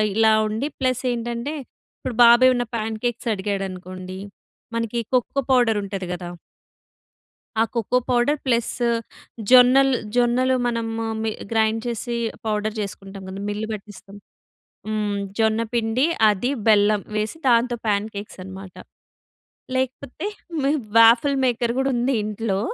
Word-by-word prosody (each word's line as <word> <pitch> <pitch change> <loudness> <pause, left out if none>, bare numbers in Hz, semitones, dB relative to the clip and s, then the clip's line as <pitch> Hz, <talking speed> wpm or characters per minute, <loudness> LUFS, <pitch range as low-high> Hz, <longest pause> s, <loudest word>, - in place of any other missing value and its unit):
ఇలా 220 0 +5
ఉండి 220 +7 -2
ప్లస్ 255 -1 0
ఏంటంటే, 240 +5 -4 0.4
ఇప్పుడు 240 - -5
బాబు 235 +1 +7
ఏమన్న 245 -1 +1
ప్యాన్ 220 0 -2
కేక్స్ 240 0 -2
అడిగాడనుకోండి 185 -2 -5 0.6
మనకి 230 0 -1 0.2
కొక్కో 265 +2 +1
పౌడర్ 240 -4 +4
ఉంటది 195 -2 -5
కదా! 175 0 -6 1.3
ఆ - - +6
కోకో 235 +2 +1
పౌడర్ 250 +5 +2
ప్లస్ 235 -2 +1 0.8
జొన్నల్ 255 +2 +7 0.2
జొన్నలు 245 +2 +3
మనము 225 -1 -2 0.2
మి 220 - 0 0.2
గ్రైండ్ 220 0 +2
చేసి 235 0 -3 0.3
పౌడర్ 215 0 -1
చేసుకుంటాం 195 -1 -7
గదా! 195 +1 -6
మిల్లు 210 +1 -3
బట్టిస్తాం. 205 -1 -10 0.7
హ్మ్. 210 -1 -1 0.2
జొన్నపిండి, 225 +2 +1 0.3
అది, 210 +5 -1 0.2
బెల్లం 210 -1 +4
వేసి 215 +6 -2
దాంతో 240 0 +3
పాన్ 205 0 +1
కేక్స్ 200 0 -8
అనమాట. 190 0 -10 1.0
లేకపోతే 260 +5 -3 0.4
మీ 275 +1 +2 0.3
వాఫల్ 235 +5 +6
మేకర్ 240 -1 0
గూడా 265 +1 +1
ఉంది 245 +3 +1
ఇంట్లో. 210 -2 -2
225 Hz, 120 wpm, -22 LUFS, 210-245 Hz, 1.3 s, బాబు